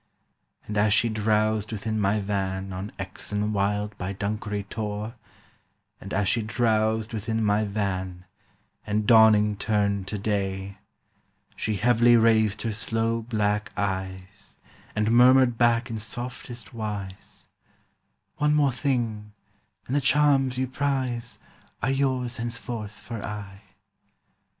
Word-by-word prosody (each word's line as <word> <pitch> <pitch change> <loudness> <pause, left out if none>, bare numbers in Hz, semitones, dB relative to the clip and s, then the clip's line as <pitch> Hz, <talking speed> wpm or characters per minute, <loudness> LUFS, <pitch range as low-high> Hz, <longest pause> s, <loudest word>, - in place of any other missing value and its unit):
"And 105 -1 -2
as 105 0 +4
she 120 - +3
drowsed 110 0 +1
within 110 0 -2
my 100 +2 +2
van 95 -1 -2
On 95 +3 -5
Exon 105 +2 -3
Wild 105 +1 -1
by 90 +2 -3
Dunkery 105 +1 -3
Tor— 105 +1 -4 0.9
And 100 - -9
as 100 -1 +1
she 115 - +2
drowsed 110 0 0
within 110 +1 -1
my 105 +1 +2
van, 95 -3 -3 0.6
And 105 0 0
dawning 105 -2 +6
turned 100 -2 0
to 105 - -2
day, 100 -1 -2 0.8
She 110 - -2
heavily 120 +2 +5
raised 110 -2 +3
her 115 - -1
sloe 115 +1 -1
black 105 -2 -1
eyes 95 0 -4 0.4
And 105 +1 +1
murmured 125 0 +6
back 120 0 +3
in 110 - -3
softest 120 -1 -5
wise, 105 -4 -6 0.9
'One 150 0 +2
more 145 -2 +3
thing, 115 -6 -2 0.5
and 130 - -2
the 145 - +3
charms 135 -2 +3
you 130 - +1
prize 130 -3 -2 0.5
Are 135 - +2
yours 130 -3 0
henceforth 115 -2 -4
for 115 -1 -8
aye. 100 -1 -7
110 Hz, 125 wpm, -26 LUFS, 100-120 Hz, 0.9 s, dawning